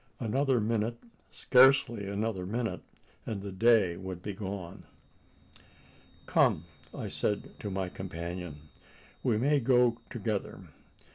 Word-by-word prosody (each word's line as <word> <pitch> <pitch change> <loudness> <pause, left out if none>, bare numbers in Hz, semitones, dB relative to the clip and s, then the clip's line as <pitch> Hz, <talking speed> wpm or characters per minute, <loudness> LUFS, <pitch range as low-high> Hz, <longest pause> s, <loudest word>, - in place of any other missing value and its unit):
Another 130 +2 +1
minute 115 +1 0 0.3
scarcely 125 -5 +4
another 100 -1 -2
minute 115 +3 -2 0.5
and 100 -3 -3
the 100 - -5
day 95 -3 +4
would 95 -1 -7
be 105 - -4
done. 95 -3 -6 1.4
"Come!" 80 - +3 0.3
I - - -5
said 105 - -2
to 105 - -4
my 95 -1 -2
companion, 85 -3 -6 0.6
"we 120 -4 +2
may 145 +5 +3
go 125 -2 +3
together. 110 -3 -3
105 Hz, 115 wpm, -30 LUFS, 95-120 Hz, 1.4 s, scarcely